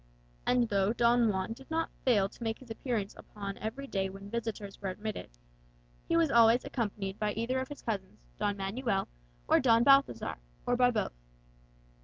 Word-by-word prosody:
And 245 -1 +3
though 200 0 +2
Don 235 -1 +4
Juan 190 +2 -1
did 270 +3 -15
not 325 0 -1
fail 210 -7 +4
to 235 - -11
make 225 -1 -1
his 255 -3 -13
appearance 225 -4 -2
upon 200 -1 -7
every 235 +6 -4
day 195 -7 -1
when 195 +1 -10
visitors 220 -4 -4
were 195 - -2
admitted, 210 +3 -5 0.8
he 335 - +2
was 325 -4 +3
always 235 +1 +6
accompanied 205 -5 -3
by 210 -1 0
either 235 +4 -1
of 260 - -3
his 290 - -9
cousins 195 - -4
Don 205 0 0
Manuel 195 +1 -1 0.4
or - - +5
Don 230 -2 +5
Balthazar, 275 - +4 0.3
or 245 - +2
by 245 0 +5
both. 230 - -1
225 Hz, 175 wpm, -31 LUFS, 200-245 Hz, 0.8 s, always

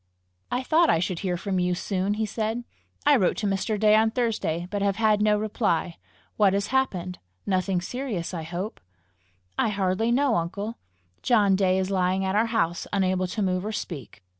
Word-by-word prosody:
"I 250 +1 -1
thought 325 +4 +3
I - - +4
should 175 +1 -2
hear 180 -3 -1
from 190 +1 -2
you 180 0 +1
soon!" 195 +2 -1
he 220 +1 -1
said. 220 +2 -2 0.4
"I 290 0 +6
wrote 195 -9 +2
to 215 - -2
Mr. 200 +2 -1
Day 215 0 +5
on 220 +1 +4
Thursday, 215 -8 -1
but 205 -1 -2
have 200 -1 +1
had 215 -1 +2
no 210 0 +3
reply. 205 -5 -1 0.4
What 200 -3 +4
has 200 +1 -1
happened? 185 -9 0 0.3
Nothing 185 -1 0
serious, 215 -4 -4
I 170 - -3
hope?" 175 +6 -5 0.8
"I - - +3
hardly 200 +3 0
know, 260 -1 +3
uncle. 200 +7 -4 0.4
John 205 -5 +4
Day 190 -1 +2
is 190 +1 -1
lying 190 0 +1
at 190 - 0
our 220 +2 +3
house, 175 -7 -1
unable 185 -2 +1
to 205 +3 -2
move 185 -1 0
or 215 - -3
speak." 145 - -7
200 Hz, 190 wpm, -26 LUFS, 185-220 Hz, 0.8 s, I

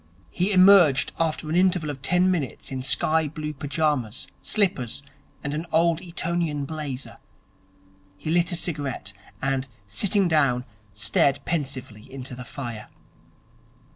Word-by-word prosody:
He 185 +4 0
emerged 185 -8 +6
after 160 -1 0
an 155 - -1
interval 180 -4 +2
of 135 -2 -9
ten 180 +5 +3
minutes 150 -8 -3
in 130 -1 -3
sky 150 +5 +2
blue 150 0 -5
pyjamas, 145 -5 -1 0.2
slippers, 140 - 0 0.4
and 145 - -2
an 160 +3 -3
Old 165 +1 +3
Etonian 170 -4 -2
blazer. 145 -3 -5 1.0
He 155 - -4
lit 175 +1 +2
a - - -1
cigarette; 145 - -4 0.3
and, 135 0 0 0.2
sitting 190 - +2
down, 135 -6 +2 0.3
stared 110 +6 +3
pensively 130 -7 -4
into 130 -1 -6
the 125 0 -7
fire. 120 -4 -7
150 Hz, 130 wpm, -25 LUFS, 130-170 Hz, 1.0 s, emerged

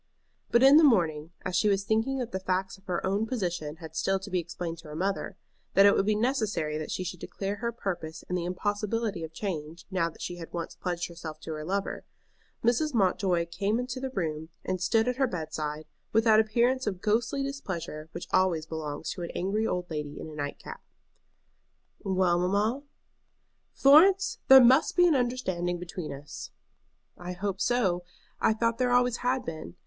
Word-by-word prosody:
But 235 +2 +4
in 275 +2 +9
the 320 - +7
morning, 165 - +3 0.2
as 185 - -2
she 210 +4 +3
was 195 -1 +1
thinking 225 +6 +1
that 245 -2 -3
the 190 - -2
facts 190 +1 -1
of 195 0 -22
her 180 -3 -2
own 200 +4 0
position 175 - -3
had 160 -1 -11
still 195 0 +1
to 195 - -8
be 180 - +1
explained 170 -1 -5
to 165 - -13
her 150 - -8
mother, 190 +4 -2 0.4
that 195 - +7
it 200 - +6
would 195 - +1
be 215 - +3
necessary 215 - 0
that 155 - -5
she 185 - -2
should 180 -1 -5
declare 200 +3 -4
her 235 +2 -2
purpose 170 -8 -5
and 180 - -2
the 180 - -1
impossibility 205 +1 -2
of 160 - -6
change, 165 -3 -5
now 175 -3 +1
that - - -11
she 175 - -5
had 165 -2 -9
once 170 -1 -4
pledged 175 -1 -3
herself 165 -3 -8
to 160 - -6
her 155 -1 -4
lover, 195 +4 -2 0.6
Mrs. 245 +5 +2
Mountjoy 185 -4 +2
came 195 +6 -1
into 250 +1 -3
the 265 0 -3
room, 160 -8 -3 0.2
and 185 -1 -2
stood 225 +4 +2
at 250 0 0
her 265 -1 +3
bedside, 155 -5 -4 0.3
with 225 +1 +4
that 220 -2 +6
appearance 240 +3 +2
of 190 -3 -2
ghostly 225 +7 0
displeasure 185 - -5
which 170 - -6
always 185 -4 +2
belongs 155 -2 -5
to 180 - -6
an 170 - -4
angry 210 +4 0
old 180 0 -2
lady 150 -1 -4
in - - -7
a 155 - -9
night 145 -1 -4
cap. - - -10 1.2
"Well, 185 -3 +1
mamma?" 205 +8 +1 0.9
"Florence, 365 +8 +5
there 265 -1 +10
must 260 +5 +5
be 355 - +6
an 335 - +4
understanding 240 -10 -1
between 175 -1 -6
us." 140 +1 -8 0.7
"I 180 0 -5
hope 195 +1 -3
so. 195 -8 +1 0.4
I - - +3
thought 230 +1 0
there 250 -1 +2
always 245 -1 +3
had 255 +1 0
been. 155 - -7
190 Hz, 195 wpm, -28 LUFS, 170-230 Hz, 1.2 s, there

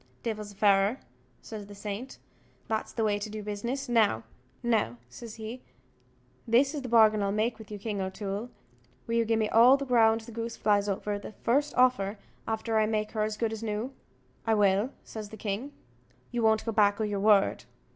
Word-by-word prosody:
"Divil 220 -2 -2
a - - -10
fairer," 200 +4 +3 0.4
says 210 -2 -8
the 205 - -11
saint, 210 +5 -6 0.5
"that's 220 -1 -2
the 225 - -2
way 205 -1 +1
to 210 +1 -5
do 215 0 -6
business. 235 +7 -3
Now," 220 - +3 0.9
says 220 - -9
he, 225 +3 -7 0.9
"this 260 +5 +4
is 295 - -3
the 255 - -6
bargain 220 -2 +5
I'll 200 0 0
make 220 +3 0
with 220 - -11
you, 210 - -6
King 205 -1 -3
O'Toole: 200 +4 -4 0.6
will 230 - -4
you 230 0 +2
gi' 225 0 +2
me 220 -1 +1
all 245 +4 +7
the 280 - -4
ground 225 -3 +4
the 225 - -11
goose 230 0 -5
flies 205 -1 +2
over, 205 +1 -2
the 205 - -9
first 285 +8 0
offer, 225 -5 +3 0.3
after 220 0 0
I 215 - +3
make 215 -1 -1
her 215 - -2
as 215 0 -1
good 225 -1 -1
as 220 - -6
new?" 225 +4 -3 0.5
"I 220 - +4
will," 205 +2 +3
says 215 -2 -8
the 220 - -10
king. 215 +7 -3 0.6
"You 240 -1 -1
won't 220 -1 +3
go 225 - -1
back 205 -1 +3
o' - - +1
your 205 -2 -1
word?" 205 -1 +3
220 Hz, 195 wpm, -29 LUFS, 205-230 Hz, 0.9 s, all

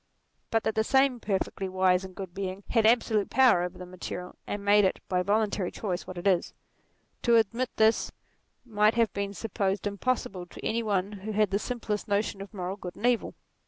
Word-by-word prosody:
But 225 -1 +1
that 220 - 0
the 220 - +1
same 265 +1 +3
perfectly 195 -2 -2
wise 185 0 +2
and 190 -1 -9
good 190 -3 -7
Being 190 +1 -4
had 225 -2 +4
absolute 225 -3 +2
power 255 -9 +5
over 180 0 -4
the 180 - -8
material, 180 0 -7
and 205 0 -4
made 205 +1 +6
it, 190 - +1
by 180 -1 +1
voluntary 205 -1 +1
choice, 185 -4 -4
what 185 - -7
it 175 - -6
is; 185 -3 +2 0.7
to 235 -1 +4
admit 230 +3 +2
this 220 +1 +3 0.5
might 215 -1 +3
have 230 -3 +2
been 200 0 -3
supposed 200 -2 -2
impossible 200 -3 -2
to - - -10
any 230 +1 0
one 200 -3 0
who 210 +1 -6
has 210 -1 +3
the 200 +1 0
simplest 225 -3 -3
notions 205 -1 0
of 195 - -8
moral 190 -1 -4
good 180 -4 -7
and 230 - -5
evil. 245 -2 +1
205 Hz, 195 wpm, -28 LUFS, 190-220 Hz, 0.7 s, made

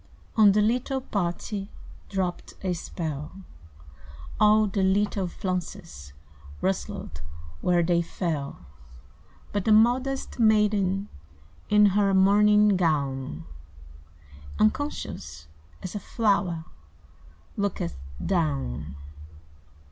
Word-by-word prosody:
On 210 -3 +6
the 210 +1 +3
little 250 +4 0
party 200 -2 -3 0.4
Dropped 185 -3 -3
a 185 -2 0
spell; 160 +1 -6 1.0
All 215 0 +5
the 200 -1 -1
little 195 0 +1
flounces 175 - -5 0.5
Rustled 75 +1 -3 0.4
where 175 -1 +3
they 170 0 +2
fell; 160 -5 -4 0.9
But 205 -2 -1
the 220 - +3
modest 250 +5 +2
maiden 210 -3 +3 0.6
In 210 0 +6
her 200 0 +2
mourning 210 +2 +5
gown, 135 - -1 1.1
Unconscious 150 - -2 0.4
as 185 - -5
a 205 - -3
flower, 195 -8 0 0.9
Looketh 130 - -2 0.3
down. 70 0 -1
195 Hz, 85 wpm, -26 LUFS, 165-210 Hz, 1.1 s, On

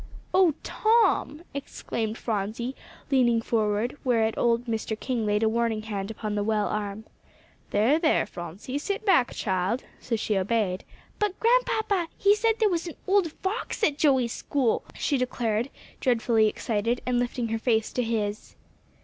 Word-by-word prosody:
"Oh 365 -5 +5
Tom!" 440 -8 +2
exclaimed 230 -5 -4
Phronsie, 225 +4 -3 0.4
leaning 240 -4 +4
forward, 220 +1 0
whereat 225 -4 +2
old 235 0 +2
Mr. 220 -1 -3
King 240 -4 -1
laid 210 +1 +2
a - - +4
warning 225 -1 0
hand 200 -2 -4
upon 215 -1 -4
the 205 0 0
well 210 -1 +1
arm. 210 0 -3 0.7
"There, 230 +10 +3
there, 320 -2 +3
Phronsie; 180 - -6
sit 400 +7 -3
back, 265 - +4
child;" 190 +5 -1 0.2
so 235 - -2
she 215 -1 -1
obeyed. 190 -1 0 0.3
"But, 415 -2 -1
Grandpapa, 440 -6 +2
he 400 +1 +5
said 450 +2 +2
there 440 - +3
was 350 -3 -1
an 335 - -7
old 380 -4 +3
fox 395 +6 -4
at 295 -7 +2
Joey's 260 -6 +3
school," 265 -6 0
she 280 -3 0
declared, 240 -1 -1 0.3
dreadfully 230 -3 +3
excited, 230 +2 -1
and 250 -1 +1
lifting 245 -1 -1
her 225 0 -1
face 225 -2 +1
to 250 - 0
his. 215 -3 -2
235 Hz, 155 wpm, -26 LUFS, 215-290 Hz, 0.7 s, Oh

